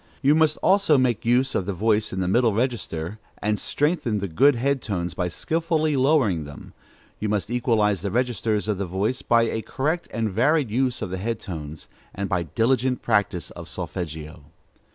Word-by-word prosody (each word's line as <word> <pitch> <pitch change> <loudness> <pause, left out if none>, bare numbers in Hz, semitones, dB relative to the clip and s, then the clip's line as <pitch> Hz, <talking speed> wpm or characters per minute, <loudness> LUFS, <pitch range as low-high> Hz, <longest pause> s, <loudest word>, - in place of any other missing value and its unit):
You 140 +2 +5
must 155 -1 +3
also 195 -6 +4
make 120 -3 +1
use 130 +2 +3
of 95 - -1
the 100 - -2
voice 105 +2 +1
in 95 - -2
the 90 - -1
middle 115 +3 +3
register, 110 -6 -2 0.2
and 105 0 0
strengthen 145 -7 0
the 100 -1 -2
good 130 - +4
head 135 +2 0
tones 90 -5 -3
by 90 0 -1
skilfully 155 - 0
lowering 130 - +2
them; 75 -1 -11 0.5
you 105 - -2
must 105 +1 -1
equalize 110 -6 +1
the 100 - -2
registers 115 -2 0
of 105 -3 -1
the 100 - -2
voice 100 +8 -1
by 115 -1 +3
a 110 -1 -1
correct 155 +9 -2
and 115 0 -1
varied 125 - +2
use 125 0 0
of 95 - -5
the 95 - -2
head 115 +3 -2
tones, 80 -5 -7 0.3
and 100 0 -2
by 90 -2 +1
diligent 125 - 0
practice 90 -7 0
of - - -9
solfeggio. 80 -2 -6
110 Hz, 185 wpm, -24 LUFS, 95-130 Hz, 0.5 s, You